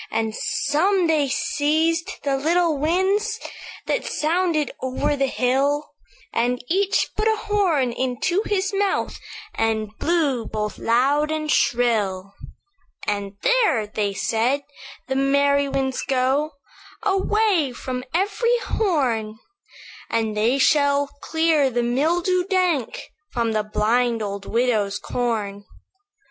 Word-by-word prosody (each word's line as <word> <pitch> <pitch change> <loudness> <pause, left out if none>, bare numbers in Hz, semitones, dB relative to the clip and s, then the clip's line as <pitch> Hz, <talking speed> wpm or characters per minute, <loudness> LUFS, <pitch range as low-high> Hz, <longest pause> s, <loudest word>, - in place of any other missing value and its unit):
"And 220 0 -1
some 370 +5 +1
they 310 -3 +2
seized 320 +5 0
the 275 -1 +1
little 330 +3 +2
winds 380 +9 +1 0.5
That - - -1
sounded 320 -1 0
over 260 +3 -1
the 275 -1 +1
hill; 275 +4 0 0.4
And 245 +2 +1
each 390 +2 +1
put 430 +1 0
a 440 - +3
horn 370 - +1
unto 260 - 0
his 405 -1 0
mouth, 400 0 -1 0.3
And 220 -1 -1
blew 295 -9 +1
both 210 -1 -4
loud 275 +6 +2
and 310 -1 -2
shrill; 205 -6 +1 0.7
"'And 200 -1 -3
there,' 440 - +3
they 210 -1 -2
said, 235 +7 0 0.4
'the 265 0 -2
merry 280 +1 +3
winds 265 -1 -1
go 270 +4 0 0.5
Away 390 - +2
from 250 +1 -5
every 410 +7 +1
horn; 250 - 0 0.7
And 220 -2 -1
they 225 +5 +2
shall 285 0 +3
clear 320 -4 +2
the 240 -1 -1
mildew 340 +9 +1
dank 365 - -1 0.2
From 230 -2 0
the 215 -1 +1
blind 225 +2 +1
old 200 -1 -5
widow's 220 -4 +1
corn. 210 -5 -3
275 Hz, 115 wpm, -22 LUFS, 230-335 Hz, 0.7 s, a